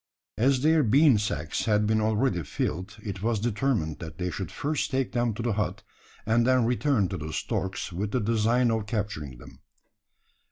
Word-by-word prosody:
As 130 +2 +3
their 160 +1 +5
bean 135 0 +5
sacks 80 -7 -2
had 105 -2 +2
been 110 +1 +2
already 110 -3 +1
filled, 90 +7 -3
it 100 -3 -5
was 115 0 0
determined 110 - -1
that 80 -2 -8
they 90 0 -2
should 95 -2 -5
first 150 0 -2
take 135 -1 -1
them 120 -1 +1
to 115 - -4
the 120 -2 0
hut, 105 0 -2 0.4
and 115 +2 +3
then 130 -2 +4
return 125 -3 +1
to 95 - -3
the 80 0 -6
storks 95 +2 -3
with 100 +4 -2
the 125 - 0
design 115 +2 +2
of 110 -2 -1
capturing 100 - -3
them. - - -14
110 Hz, 185 wpm, -27 LUFS, 95-120 Hz, 0.4 s, their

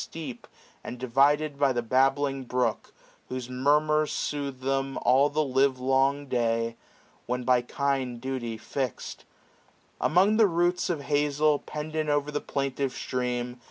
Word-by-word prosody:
Steep, 155 -7 -8 0.4
and 125 - -6
divided 140 +4 +2
by 140 -1 +4
a 120 -2 0
babbling 135 +3 +1
brook. 125 +1 -1 0.4
Whose 125 -1 -5
murmurs 150 +4 +2
soothe 140 -3 -3
them 135 0 -1
all 130 +4 +4
the 155 +1 0
live^long 135 +1 +1
day. 115 -2 0 0.5
When 125 +1 -2
by 125 -1 +3
kind 130 -1 -2
duty 120 -3 -4
fix'd. 130 +2 -5 0.8
Among 195 +6 +4
the 220 -2 +6
roots 175 0 +1
645 170 -4 -1
Of 145 +1 -2
hazel, 150 +1 +2
pendant 155 0 -4
o'er 145 0 0
the 145 - -2
plaintive 135 -1 -2
stream. 125 -1 -3
135 Hz, 135 wpm, -27 LUFS, 125-145 Hz, 0.8 s, the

